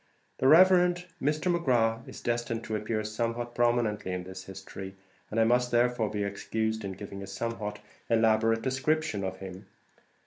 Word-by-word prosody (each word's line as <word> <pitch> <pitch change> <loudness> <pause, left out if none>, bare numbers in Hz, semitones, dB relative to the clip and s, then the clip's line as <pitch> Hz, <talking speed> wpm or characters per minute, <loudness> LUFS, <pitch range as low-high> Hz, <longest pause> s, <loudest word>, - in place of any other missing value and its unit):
The 130 - +3
Rev. 180 +3 +7 0.3
Mr. 155 +5 +1
McGrath 115 -8 +1
is - - -9
destined 120 -1 -2
to 110 - -3
appear 110 +1 -2
somewhat 115 +2 -3
prominently 120 -5 +1
in 90 0 -3
this 95 0 -9
history, 95 0 -8 0.3
and 110 - -1
I - - +6
must 125 +2 +3
therefore 120 -2 +2
be 105 -1 -2
excused 110 +2 -2
in 95 -1 -4
giving 100 +1 -8
a 100 - -7
somewhat 105 0 -4 0.3
elaborate 115 0 +3
description 130 -4 0
of 95 0 -3
him. 95 -1 -9
115 Hz, 160 wpm, -29 LUFS, 100-120 Hz, 0.3 s, Rev